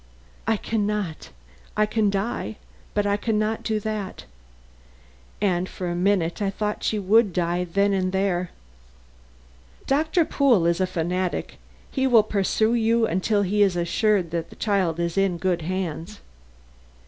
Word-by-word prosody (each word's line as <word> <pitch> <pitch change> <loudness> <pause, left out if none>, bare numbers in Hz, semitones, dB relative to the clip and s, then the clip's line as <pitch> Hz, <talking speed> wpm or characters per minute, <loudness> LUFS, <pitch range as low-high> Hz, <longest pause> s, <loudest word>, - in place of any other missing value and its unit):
"I 225 -1 +2
can 210 0 -1
not. 195 - -3 0.5
I 215 - +4
can 215 -1 +1
die, 200 +2 -2 0.4
but 205 -1 +1
I 205 0 +2
can 220 0 -1
not 215 +1 0
do 220 -1 -1
that." 215 -2 -4 1.1
And 185 -3 0
for 180 - -5
a 175 - -2
minute 180 0 +1
I 200 - +1
thought 210 +1 -3
she 215 - 0
would 205 +2 +3
die 175 +1 0
then 200 +3 +1
and 185 -1 0
there. 185 -2 0 1.4
"Doctor 315 +4 +2
Pool 250 - +3
is 170 +2 +2
a 185 - +2
fanatic; 180 +1 -2 0.3
he 265 -1 +1
will 235 -4 +6
pursue 215 +2 +1
you 230 0 +3
until 205 +3 +1
he 205 +2 +1
is 195 -3 +4
assured 175 +1 +1
that 170 -1 -3
the - - -13
child 190 -6 0
is 170 +2 0
in 195 -3 +1
good 175 -1 0
hands." 185 +2 -4
200 Hz, 155 wpm, -24 LUFS, 180-215 Hz, 1.4 s, will